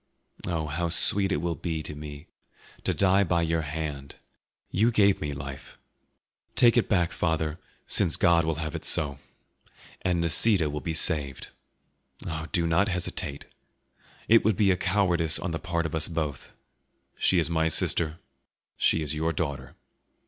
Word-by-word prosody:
Oh, 85 -3 -2
how 85 +3 -2
sweet 95 +3 +3
it 75 - 0
will 85 -1 0
be 80 -2 -4
to 75 - -6
me 75 +1 -9 0.6
to - - +2
die 95 0 +3
by 85 -2 +1
your 80 0 0
hand! 75 -2 -5 0.6
You 110 +5 +3
gave 100 -4 +3
me 75 -2 -3
life; 70 -1 -8 0.8
take 120 -1 +5
it 120 - +2
back, 90 -4 +2
father, 80 -1 -1 0.3
since 85 -5 +3
God 85 -1 +3
will 80 0 -1
have 80 0 -4
it 80 - -5
so. 70 -5 +2 0.8
And 90 -2 0
Nisida 85 0 +2
will 75 0 -4
be 80 -2 -4
saved. 75 -4 +1 0.8
Oh, 80 0 -4
do 85 -2 +1
not 85 +5 +2
hesitate! 90 -5 -3 0.8
It 115 +1 +5
would 110 -4 +1
be 100 -2 +4
a - - +3
cowardice 90 -4 +2
on 85 +2 -4
the 80 - -3
part 85 -1 -2
of 80 - -3
both 80 0 -1
of 85 - -9
us; 75 -4 -3 0.7
she 95 - +2
is 85 -1 +1
my 80 -1 +1
sister, 80 0 0 0.6
she 80 - +2
is 75 -1 -3
your 80 +2 -1
daughter." 70 -5 -4
80 Hz, 165 wpm, -27 LUFS, 75-90 Hz, 0.8 s, take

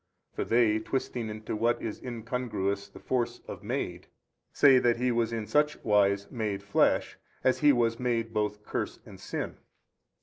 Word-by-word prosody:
for - - -2
they 115 -2 +3
twisting 120 -1 -3
into 110 0 -5
what 120 +2 +1
is 110 - -5
incongruous 110 -5 -3
the - - -14
force 120 -2 -1
of - - -7
MADE, - - -3 0.4
say 135 -3 +6
that 120 -1 +2
He 125 +1 +1
was 115 -1 +1
in 115 -2 -3
such 150 +5 +2
wise 100 -2 +3
MADE 105 -4 -2
flesh, 100 - +2 0.2
as 130 - +3
He 150 -1 +6
was 115 -3 +1
made 115 -2 -1
both 105 -1 -1
curse - - -3
and - - -12
sin. - - -4
115 Hz, 165 wpm, -29 LUFS, 105-125 Hz, 0.4 s, say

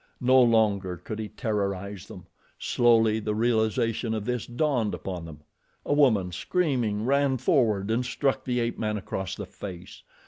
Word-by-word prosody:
No 130 +1 +5
longer 105 -6 +2
could 105 +5 -7
he 110 - -3
terrorize 100 -3 -3
them. 90 - -11 0.3
Slowly 115 -2 +3
the 105 -1 -2
realization 110 0 0
of 105 -2 -4
this 125 -1 -2
dawned 120 -3 0
upon 90 -3 -6
them. 75 -2 -11 0.4
A - - +1
woman, 110 -11 +3
screaming, 120 - -1
ran 140 0 +2
forward 110 - +1
and 120 +3 +1
struck 135 +2 -1
the 125 -1 -1
ape 115 0 -2
man 105 -1 -1
across 95 -1 -4
the 105 - -6
face. 90 -1 -9
110 Hz, 160 wpm, -26 LUFS, 100-125 Hz, 0.4 s, No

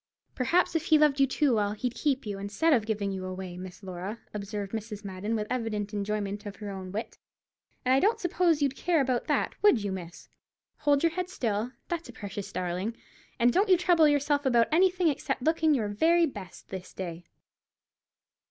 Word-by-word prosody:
"Perhaps, 335 +8 +1
if 325 0 0
he 315 - +5
loved 295 -2 +3
you 275 - +5
too 270 0 +2
well, 205 -2 +1
he'd 245 +3 -3
keep 275 -3 0
you, 200 -2 -4
instead 205 +12 +1
of 225 -5 +2
giving 205 -3 -1
you 190 -1 -4
away, 185 -1 -6
Miss 185 +2 -9
Laura," 190 +4 -5 0.2
observed 200 -1 -4
Mrs. 215 -2 -5
Madden, 200 +3 -3
with 210 -1 -1
evident 215 -5 -2
enjoyment 205 0 -3
of 200 - -7
her 205 -2 -6
own 190 -1 -7
wit; 215 +4 -5 0.7
"and 255 - +4
I 265 - +5
don't 425 +8 +2
suppose 345 -4 +2
you'd 275 -1 +1
care 340 -2 +1
about 255 -3 0
that, - - +1
would 295 - +5
you, 200 - -2
miss? 175 -2 -7 0.5
Hold 290 0 +2
your 335 - +4
head 360 +1 -3
still, 230 - -2
that's 340 0 -4
a - - -9
precious 200 -1 -6
darling, 185 +5 -3 0.4
and 240 +1 +4
don't 395 +2 +3
you 370 - +7
trouble 345 -3 +4
yourself 290 0 +2
about 240 -4 +3
anything 360 +1 +3
except 280 -3 -1
looking 320 0 +3
your 215 -5 -1
very 330 +11 +4
best 205 - -9
this 190 -1 -7
day." 175 -2 -5
230 Hz, 195 wpm, -28 LUFS, 200-300 Hz, 0.7 s, you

